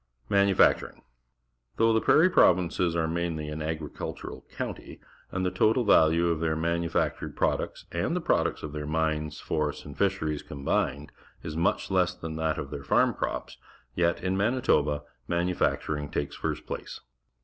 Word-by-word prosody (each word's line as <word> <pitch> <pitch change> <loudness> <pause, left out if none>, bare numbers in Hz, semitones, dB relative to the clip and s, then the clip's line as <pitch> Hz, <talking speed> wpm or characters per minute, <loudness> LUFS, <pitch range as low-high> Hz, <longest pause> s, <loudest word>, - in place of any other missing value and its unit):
Manufacturing. 100 -1 +3 0.4
— - - -44
Though 115 0 +4
the 110 - +3
Prairie 175 +4 +5
Provinces 90 - +3
are 80 -1 +1
mainly 80 -2 -2
an 75 +1 -5
agricultural 80 -1 -5
countrj', - - -5 0.3
and 95 0 -1
the 90 - +1
total 110 +7 +3
value 85 -4 +4
of 85 -2 0
their 80 -1 0
manufactured 85 +1 -1
products - - -1
and - - -1
the - - +1
products - - 0
of 75 - -5
their 75 -1 -4
mines, 75 -1 -1
forests, 75 -2 -2
and 70 -1 -9
fisheries 80 -7 0
combined 70 +1 -2 0.3
is 75 - -5
much 85 +4 0
less 90 -2 +2
than 80 -1 -6
that 80 -1 0
of 70 - -5
their 70 -2 -6
farm - - +3
crops, - - -4 0.4
yet,^ 85 +3 +1
Mani 115 +7 +1
toba, 75 -7 +2 0.2
manufacturing 85 -4 0
takes 70 -1 -3
first - - -3
place. - - -6
80 Hz, 155 wpm, -28 LUFS, 75-90 Hz, 0.4 s, Prairie